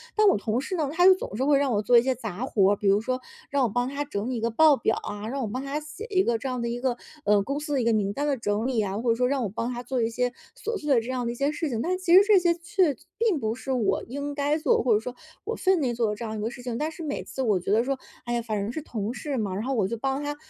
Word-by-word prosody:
但 430 -1 +5
我 390 - +5
同 220 +3 -1
事 325 +7 -4
呢， 305 -5 0
他 355 +2 +4
就 375 0 +9
总 215 - -6
是 260 - 0
会 285 -1 +5
让 280 -2 +1
我 205 - +2
做 240 +3 +5
一 - - +7
些 260 +1 +1
杂 225 -1 -5
活 200 -6 +3
儿， - - +3
比 205 - -8
如 195 +1 +5
说， 255 +3 -2 0.3
让 280 -2 +1
我 240 - +2
帮 245 +4 0
他 280 +2 -3
整 220 -5 -4
理 255 - -2
一 225 - -3
个 230 - +1
报 305 +5 +6
表 225 -3 0
啊， 205 +1 -5
让 275 +2 -3
我 235 - -1
帮 255 +6 -4
他 280 +2 -2
写 305 +8 -9
一 380 -2 +3
个 235 -7 +1
这 260 +4 -4
样 250 -1 -3
的 235 - -1
一 240 +1 -3
个， 250 -2 0 0.3
呃， 210 -6 +4
公 280 +6 -2
司 295 0 -5
的 270 - +2
一 230 - -1
个 230 - +3
名 205 -2 +1
单 285 +8 -2
的 280 - +2
整 215 +1 -1
理 245 -4 +1
啊， 195 0 -3
或 240 - -1
者 230 - +4
说 250 +2 +1
让 275 0 0
我 - - 0
帮 230 +4 -3
他 240 - -5
做 255 -1 -1
一 225 - +1
些 245 +2 0 0.2
琐 455 0 -4
碎 300 -7 +1
的 240 - +5
这 230 - -8
样 255 -1 -2
的 235 - -1
一 240 - -6
些 275 +3 +1
事 315 0 -2
情。 230 -3 -2
但 365 +6 0
其 365 -2 +1
实 375 - +10
这 420 -2 +7
些 345 -1 +3
却 345 -1 +1 0.2
并 435 -8 +2
不 220 -2 -1
是 265 +2 -5
我 240 -6 +1
应 285 +3 -5
该 290 +1 +1
做 310 - +2
的， - - -1
或 245 - +3
者 210 - +4
是 - - -14
说 250 - -5 0.3
我 455 - -2
分 375 -1 +2
内 255 -5 0
做 230 -2 0
的 210 - -2
这 230 - -6
样 220 0 -4
一 - - -4
个 220 - -1
事 245 - -10
情。 245 -2 -4
但 305 +4 -2
是 330 +1 -8
每 285 -2 -3
次 265 - -5
我 215 -6 +2
觉 180 - -3
得 220 +3 +4
说， 275 0 -1 0.3
哎 240 - -2
呀， 240 - 0
反 220 -2 -3
正 200 +1 -2
是 315 - -4
同 220 -5 -4
事 275 +1 -4
嘛， 200 -5 -2
然 205 - -3
后 270 +2 -1
我 215 -7 +1
就 230 - -3
帮 270 +4 -1
他 290 0 -3
250 Hz, 370 characters per minute, -26 LUFS, 225-290 Hz, 0.3 s, 实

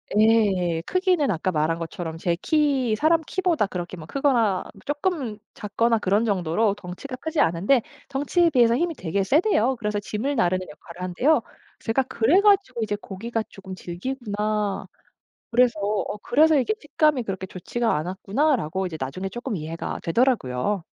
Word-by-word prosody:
예. 205 -6 +3
크기는 365 -6 +1
아까 185 +1 -1
말한 160 +1 0
것처럼 165 -1 -5
제 170 0 -1
키 275 -7 +2
사람 320 +6 +3
키보다 350 - +1
그렇게 180 -1 -6
막 155 - -10
크거나 235 -8 +1 0.2
쪼끔 290 - -2 0.2
작거나 230 +3 +1
그런 205 +2 +1
정도로 200 0 +1
덩치가 205 +8 -8
크지 320 +3 -1
않은데 185 +10 +3 0.3
덩치에 290 +5 +2
비해서 235 -4 +4
힘이 340 +3 0
되게 190 +1 -1
세대요. 265 - +2
그래서 210 -2 -2
짐을 225 +7 -3
나르는 185 -1 +1
역할을 170 +3 -12
한대요. 185 - +2 0.4
제가 235 +4 0
그래 260 +7 +3
가지고 400 - +3
이제 210 -1 -1
'고기가 220 +3 -4
조끔 190 -1 -9
질기구나.' 210 +1 -3 0.6
그래서 235 -2 +3
어 205 0 -1
그래서 305 +3 +4
'이게 350 +12 +1
식감이 295 -4 +1
그렇게 190 -2 -4
좋지가 225 +6 -2
않았구나.'라고 190 - 0
이제 165 -3 -5
나중에 140 +9 -4
쪼끔 240 +1 -4
이해가 160 +1 -5
되더라고요. 200 - +1
215 Hz, 365 characters per minute, -24 LUFS, 185-270 Hz, 0.6 s, 비해서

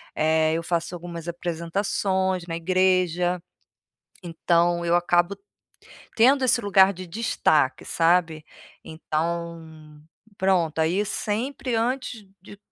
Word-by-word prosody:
eh, 160 0 +2
eu 165 - -3
faço 170 +1 -2
algumas 170 -1 -8
apresentações 180 +2 -2
na 165 - -4
igreja. 180 0 +1 0.8
Então, 170 +1 +1
eu 170 - +2
acabo 175 +2 +2 0.8
tendo 260 +4 +4
esse 250 -1 +3
lugar 195 -1 +5
de 185 +1 -9
destaque, 160 - 0
sabe. 165 -2 +1 0.4
Então, 160 -1 -5 0.4
pronto, 175 -5 +1
aí 175 +6 +1
sempre 240 +5 -3
antes 240 -1 -2 0.2
de 205 +1 -13
175 Hz, 105 wpm, -24 LUFS, 165-195 Hz, 0.8 s, lugar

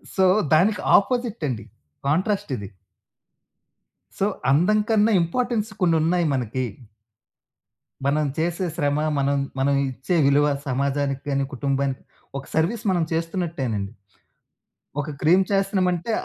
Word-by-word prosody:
So, 190 - +4 0.3
దానికి 195 +7 +3 0.2
opposite 235 -2 -1
అండి 115 -5 -4 0.4
contrast 190 +4 0
ఇది. 100 -2 -7 1.5
సో, 195 - +2 0.3
అందం 180 +9 +4
కన్నా 220 0 +4
ఇంపార్టెన్స్ 225 +5 -1
కొన్ని 170 -2 +3
ఉన్నాయి 175 +2 +2
మనకి. 130 0 -2 1.4
మనం 150 +2 +2
చేసే 170 +3 -1
శ్రమ 145 -3 0 0.2
మనం, 140 0 +1 0.2
మనం 140 +1 +2 0.2
ఇచ్చే 130 +7 -2
విలువ 145 +1 +4 0.2
సమాజానికి 140 +1 -1
కానీ, 140 0 +1
కుటుంబానికి 135 0 -1 0.4
ఒక 135 - -7
సర్విస్ 190 +8 0
మనం 175 -3 +1
చేస్తున్నట్టేనండి. 160 - -2 1.1
ఒక 145 +2 -3
క్రీమ్ 180 +5 +5
చేస్తున్నామంటే, 195 0 +1
160 Hz, 110 wpm, -23 LUFS, 140-190 Hz, 1.5 s, క్రీమ్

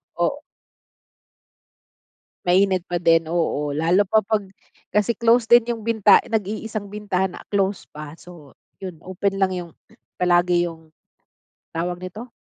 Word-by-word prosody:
Oo. - - -1 2.0
Mainit 185 0 +3
pa 175 - 0
din, 165 -1 +3
oo, 160 -3 0
lalo 165 +6 +2
pa 220 -2 +3
pag 215 0 +1 0.5
kasi 210 +3 +1
close 235 +1 +3
din 240 0 +5
yung 230 -2 -3
binta 220 -3 +5
nag-iisang 215 -1 -3
bintana 190 -3 -2 0.2
close 195 -1 0
pa 150 +1 -10
so, 165 -6 -15 0.2
yun 185 -3 -7
open 195 +2 -2
lang 190 -1 +1
yung 175 -2 -6 0.5
palagi 175 -1 +3
yung 160 -2 -9 0.8
tawag 175 +2 -3
nito, 210 +7 -7
185 Hz, 125 wpm, -22 LUFS, 175-210 Hz, 2.0 s, din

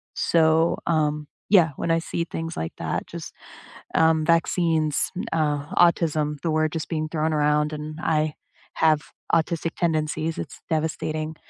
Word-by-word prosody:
So, 160 0 +3
um 150 -2 +1 0.2
yeah, 175 -7 +5
when 165 - -1
I 165 - +3
see 170 0 -3
things 165 0 -5
like 80 0 -3
that, - - -2
just, - - -8 0.6
um, 160 -1 +4
vaccines, 165 -2 +2
m - - -3
uh, 150 -3 0
autism, 155 -3 +2
the 165 - -1
word 155 0 +1
just 160 - -4
being 155 -2 -1
thrown 155 -1 0
around, 150 0 +2
and 155 +1 -6
I 155 -2 +1 0.4
have 155 -2 +3 0.3
autistic 165 0 0
tendencies, 160 -1 -1
it's - - -7
devastating. 155 0 -2
155 Hz, 145 wpm, -24 LUFS, 155-165 Hz, 0.6 s, yeah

